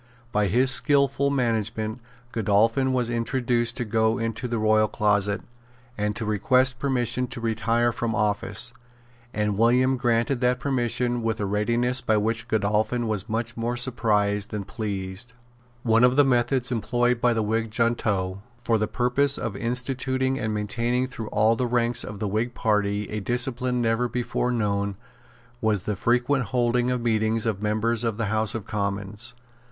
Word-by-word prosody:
By 105 Hz, -1 st, +2 dB
his 125 Hz, +7 st, +3 dB
skilful 140 Hz, 0 st, +3 dB
management 110 Hz, -3 st, -1 dB, 0.3 s
Godolphin 115 Hz, +5 st, +2 dB
was 125 Hz, -2 st, 0 dB
induced 120 Hz, 0 st, 0 dB
to 125 Hz, -, -2 dB
go 110 Hz, +1 st, +1 dB
into 115 Hz, +1 st, -3 dB
the 120 Hz, -1 st, -2 dB
royal 110 Hz, 0 st, +3 dB
closet, 105 Hz, -2 st, +1 dB, 0.5 s
and 105 Hz, 0 st, -1 dB
to 110 Hz, -, -4 dB
request 125 Hz, +5 st, +2 dB
permission 125 Hz, -2 st, 0 dB
to 125 Hz, 0 st, -7 dB
retire 115 Hz, +1 st, +1 dB
from 115 Hz, -1 st, -2 dB
office; 105 Hz, +2 st, -1 dB, 0.6 s
and 105 Hz, -2 st, -1 dB
William 125 Hz, +3 st, +3 dB
granted 120 Hz, +1 st, +1 dB
that 125 Hz, 0 st, +2 dB
permission 125 Hz, -3 st, 0 dB
with 115 Hz, -1 st, -1 dB
a 105 Hz, -, -1 dB
readiness 120 Hz, +5 st, +1 dB
by 110 Hz, -, +2 dB
which 115 Hz, +3 st, -1 dB
Godolphin 110 Hz, +2 st, 0 dB
was 105 Hz, -4 st, -2 dB
much 115 Hz, +2 st, -2 dB
more 120 Hz, +1 st, -2 dB
surprised 105 Hz, -5 st, +1 dB
than 105 Hz, -2 st, -4 dB
pleased. 100 Hz, +2 st, -4 dB, 0.5 s
One 115 Hz, 0 st, +3 dB
of 125 Hz, +1 st, +5 dB
the 145 Hz, 0 st, +5 dB
methods 125 Hz, 0 st, +1 dB
employed 120 Hz, +1 st, 0 dB
by 120 Hz, -1 st, +3 dB
the 110 Hz, -, +1 dB
Whig 110 Hz, +1 st, -1 dB
junto, 100 Hz, -5 st, 0 dB, 0.2 s
for 115 Hz, -2 st, +2 dB
the 110 Hz, -, 0 dB
purpose 125 Hz, +5 st, +1 dB
of 115 Hz, -6 st, -4 dB
instituting 130 Hz, +3 st, -1 dB
and 110 Hz, 0 st, -2 dB
maintaining 120 Hz, +4 st, -1 dB
through 120 Hz, -4 st, -7 dB
all 110 Hz, +2 st, +3 dB
the 125 Hz, +2 st, -1 dB
ranks 120 Hz, 0 st, +2 dB
of 105 Hz, -, -7 dB
the 105 Hz, -, -2 dB
Whig 110 Hz, +5 st, -2 dB
party 105 Hz, -1 st, 0 dB
a 105 Hz, -, -2 dB
discipline 125 Hz, +3 st, -1 dB
never 115 Hz, +2 st, +1 dB
before 125 Hz, 0 st, -1 dB
known, 100 Hz, -3 st, -1 dB, 0.7 s
was 105 Hz, -4 st, +1 dB
the 105 Hz, -, -2 dB
frequent 125 Hz, +5 st, +1 dB
holding 120 Hz, +2 st, +1 dB
of 125 Hz, -1 st, -1 dB
meetings 110 Hz, -1 st, +1 dB
of 105 Hz, -3 st, -1 dB
members 110 Hz, +2 st, +1 dB
of 115 Hz, -3 st, -1 dB
the 115 Hz, -, -1 dB
House 110 Hz, +1 st, +1 dB
of 115 Hz, -, -4 dB
Commons. 100 Hz, +2 st, -4 dB
115 Hz, 160 wpm, -25 LUFS, 105-125 Hz, 0.7 s, of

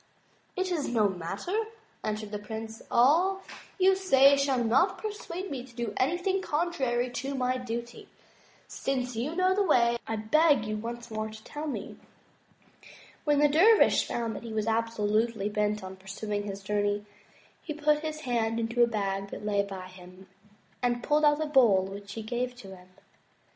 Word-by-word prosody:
It 370 Hz, -1 st, -1 dB
is 320 Hz, -5 st, -1 dB
no 220 Hz, -4 st, +3 dB
matter," 190 Hz, -, -4 dB, 0.5 s
answered 215 Hz, -1 st, -3 dB
the 210 Hz, -, -3 dB
Prince, 220 Hz, +1 st, -7 dB
"all 345 Hz, +11 st, +3 dB, 0.3 s
you 380 Hz, 0 st, +5 dB
say 280 Hz, -8 st, +5 dB
shall 275 Hz, -3 st, +1 dB
not 240 Hz, -, +3 dB
persuade 390 Hz, -3 st, -6 dB
me 260 Hz, -3 st, -4 dB
to 250 Hz, -2 st, -16 dB
do 235 Hz, -3 st, -3 dB
anything 355 Hz, +7 st, 0 dB
contrary 280 Hz, -8 st, 0 dB
to 270 Hz, +3 st, -4 dB
my 255 Hz, 0 st, 0 dB
duty. 235 Hz, 0 st, -6 dB, 0.6 s
Since 255 Hz, -2 st, -2 dB
you 265 Hz, +9 st, -2 dB
know 370 Hz, +1 st, +3 dB
the 405 Hz, -, +1 dB
way 240 Hz, -10 st, +3 dB
I 225 Hz, -, -1 dB
beg 280 Hz, +3 st, +3 dB
you 215 Hz, 0 st, -2 dB
once 235 Hz, +2 st, -6 dB
more 215 Hz, 0 st, -3 dB
to 215 Hz, 0 st, -12 dB
tell 295 Hz, +6 st, -6 dB
me." 290 Hz, -, -5 dB, 1.3 s
When 295 Hz, -1 st, +3 dB
the 295 Hz, +1 st, +5 dB
dervish 380 Hz, +10 st, +5 dB
found 230 Hz, -2 st, -2 dB
that -, -, -6 dB
he 230 Hz, -2 st, -7 dB
was 215 Hz, -1 st, -1 dB
absolutely 225 Hz, -1 st, 0 dB
bent 210 Hz, -1 st, -1 dB
on 190 Hz, 0 st, -8 dB
pur 190 Hz, +1 st, -19 dB
suing 205 Hz, +1 st, -3 dB
his 195 Hz, 0 st, -6 dB
journey, 205 Hz, 0 st, 0 dB, 0.6 s
he 305 Hz, -, -6 dB
put 300 Hz, 0 st, +2 dB
his 310 Hz, 0 st, -5 dB
hand 230 Hz, -4 st, 0 dB
into 230 Hz, +1 st, 0 dB
a 240 Hz, -, +7 dB
bag 200 Hz, -3 st, -2 dB
that 210 Hz, -, -8 dB
lay 205 Hz, -1 st, +2 dB
by 195 Hz, -2 st, -6 dB
him, 185 Hz, 0 st, -14 dB, 0.5 s
and 240 Hz, -1 st, 0 dB
pulled 300 Hz, +1 st, +3 dB
out 295 Hz, +1 st, +3 dB
a -, -, -2 dB
bowl 240 Hz, -10 st, +5 dB
which 200 Hz, +1 st, -8 dB
he 225 Hz, -, -6 dB
gave 245 Hz, +3 st, -3 dB
to 195 Hz, -6 st, -11 dB
him. 180 Hz, 0 st, -17 dB
235 Hz, 175 wpm, -28 LUFS, 210-295 Hz, 1.3 s, a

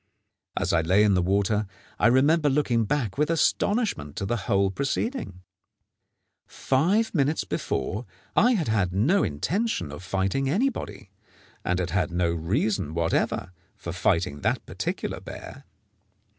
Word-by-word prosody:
As -, -, 0 dB
I 85 Hz, -, +4 dB
lay 95 Hz, +6 st, +4 dB
in 105 Hz, -2 st, +4 dB
the 90 Hz, -, +3 dB
water, 100 Hz, +3 st, +1 dB, 0.3 s
I 105 Hz, -, +5 dB
remember 145 Hz, +5 st, +4 dB
looking 125 Hz, -5 st, +1 dB
back 125 Hz, -2 st, -1 dB
with 150 Hz, -, +2 dB
astonishment 165 Hz, -, +1 dB
to 100 Hz, -, -3 dB
the 120 Hz, -, 0 dB
whole 100 Hz, -2 st, +3 dB
proceeding. 135 Hz, -, -3 dB, 1.0 s
Five 185 Hz, +12 st, +1 dB
minutes 150 Hz, -2 st, +1 dB
before 95 Hz, -, -3 dB, 0.3 s
I 245 Hz, +4 st, +5 dB
had 175 Hz, -10 st, 0 dB
had 100 Hz, -5 st, +1 dB
no 135 Hz, -, +3 dB
intention 125 Hz, -, -1 dB
of 75 Hz, -, -8 dB
fighting 95 Hz, +8 st, -1 dB
anybody, 200 Hz, -, -2 dB, 0.5 s
and 90 Hz, -, 0 dB
had 90 Hz, -2 st, -2 dB
had 90 Hz, 0 st, +1 dB
no 85 Hz, -1 st, 0 dB
reason 85 Hz, -, -1 dB
whatever 85 Hz, +2 st, 0 dB, 0.2 s
for -, -, -6 dB
fighting 70 Hz, 0 st, 0 dB
that -, -, 0 dB
particular -, -, -4 dB
bear. -, -, -10 dB
105 Hz, 140 wpm, -26 LUFS, 90-150 Hz, 1.0 s, I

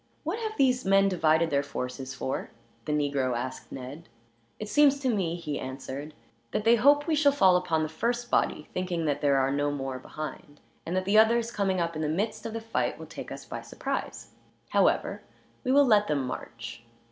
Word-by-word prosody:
"What 335 Hz, +8 st, -2 dB
have 435 Hz, -1 st, -4 dB
these 255 Hz, -2 st, +3 dB
men 195 Hz, 0 st, +4 dB
divided 165 Hz, -2 st, +2 dB
their 140 Hz, -1 st, +3 dB
forces 130 Hz, -2 st, -5 dB
for?" 130 Hz, -, -3 dB, 0.4 s
the -, -, -2 dB
negro 140 Hz, -4 st, 0 dB
asked 130 Hz, +2 st, -6 dB
Ned. 135 Hz, +5 st, -8 dB, 0.5 s
"It 215 Hz, -, -6 dB
seems 280 Hz, +5 st, +4 dB
to 260 Hz, -3 st, +1 dB
me," 175 Hz, -5 st, 0 dB
he 150 Hz, -4 st, -4 dB
answered, 135 Hz, +3 st, -6 dB, 0.4 s
"that -, -, 0 dB
they 230 Hz, +2 st, +6 dB
hope 285 Hz, +5 st, +5 dB
we 330 Hz, -, 0 dB
shall 290 Hz, -1 st, +4 dB
fall 190 Hz, -10 st, +5 dB
upon 165 Hz, -3 st, +1 dB
the -, -, -1 dB
first 240 Hz, +9 st, -2 dB
body, 150 Hz, -, +1 dB
thinking 180 Hz, -3 st, -2 dB
that 145 Hz, -2 st, 0 dB
there 140 Hz, -2 st, +3 dB
are 135 Hz, 0 st, +2 dB
no 145 Hz, +1 st, +1 dB
more 135 Hz, -2 st, -4 dB
behind; 150 Hz, +1 st, -8 dB, 0.3 s
and 175 Hz, -, -2 dB
that 185 Hz, 0 st, 0 dB
the 205 Hz, +3 st, +5 dB
others, 230 Hz, +1 st, +3 dB
coming 195 Hz, -4 st, 0 dB
up 170 Hz, -1 st, -1 dB
in 155 Hz, -, -3 dB
the 150 Hz, -, 0 dB
midst 215 Hz, +6 st, -2 dB
of 225 Hz, -, -7 dB
the 225 Hz, -, -4 dB
fight, 225 Hz, 0 st, -1 dB
will -, -, -9 dB
take -, -, -9 dB
us -, -, -7 dB
by -, -, -6 dB
surprise. -, -, -5 dB, 0.4 s
However, -, -, +2 dB, 0.4 s
we 255 Hz, -, 0 dB
will 285 Hz, +1 st, +6 dB
let 210 Hz, -4 st, +4 dB
them 145 Hz, -3 st, 0 dB
march. 115 Hz, -1 st, -7 dB
170 Hz, 205 wpm, -28 LUFS, 145-225 Hz, 0.5 s, they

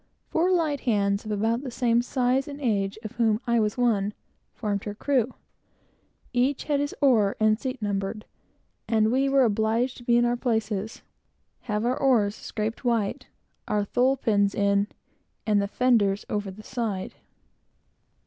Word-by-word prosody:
Four 345 Hz, +3 st, +2 dB
light 315 Hz, -6 st, +1 dB
hands, 200 Hz, -4 st, 0 dB
of 215 Hz, -, -4 dB
about 225 Hz, +3 st, 0 dB
the 275 Hz, -, -5 dB
same 240 Hz, -1 st, +2 dB
size 255 Hz, +1 st, 0 dB
and 285 Hz, 0 st, -7 dB
age, 200 Hz, -7 st, 0 dB
of 215 Hz, -, -6 dB
whom 220 Hz, -3 st, +1 dB
I 235 Hz, -1 st, +2 dB
was 210 Hz, +1 st, 0 dB
one, 210 Hz, -4 st, +1 dB, 0.4 s
formed 205 Hz, -3 st, -2 dB
the 205 Hz, +1 st, -6 dB
crew. 255 Hz, 0 st, 0 dB, 1.0 s
Each 255 Hz, +3 st, +1 dB
had 290 Hz, -2 st, 0 dB
his 285 Hz, 0 st, -2 dB
oar 225 Hz, -8 st, +4 dB
and 215 Hz, 0 st, +3 dB
seat 255 Hz, -3 st, -4 dB
numbered, 200 Hz, +1 st, -2 dB, 0.6 s
and 220 Hz, -1 st, +2 dB
we 270 Hz, +2 st, +2 dB
were 270 Hz, -1 st, +4 dB
obliged 225 Hz, +3 st, +1 dB
to 240 Hz, -, -12 dB
be 235 Hz, 0 st, +3 dB
in 240 Hz, -, +4 dB
our 240 Hz, 0 st, +1 dB
places, 220 Hz, -3 st, -2 dB, 0.6 s
have 210 Hz, 0 st, -2 dB
our 250 Hz, +1 st, +1 dB
oars 230 Hz, -7 st, +3 dB
scraped 220 Hz, +1 st, -4 dB
white, 230 Hz, -5 st, -1 dB, 0.4 s
our 210 Hz, -1 st, 0 dB
tholepins 225 Hz, -5 st, +2 dB
in, 200 Hz, 0 st, +2 dB, 0.6 s
and 210 Hz, -2 st, +3 dB
the 200 Hz, -, -1 dB
fenders 210 Hz, -4 st, +2 dB
over 205 Hz, -1 st, -2 dB
the 200 Hz, +3 st, -11 dB
side. 220 Hz, -6 st, -3 dB
225 Hz, 160 wpm, -26 LUFS, 205-250 Hz, 1.0 s, oar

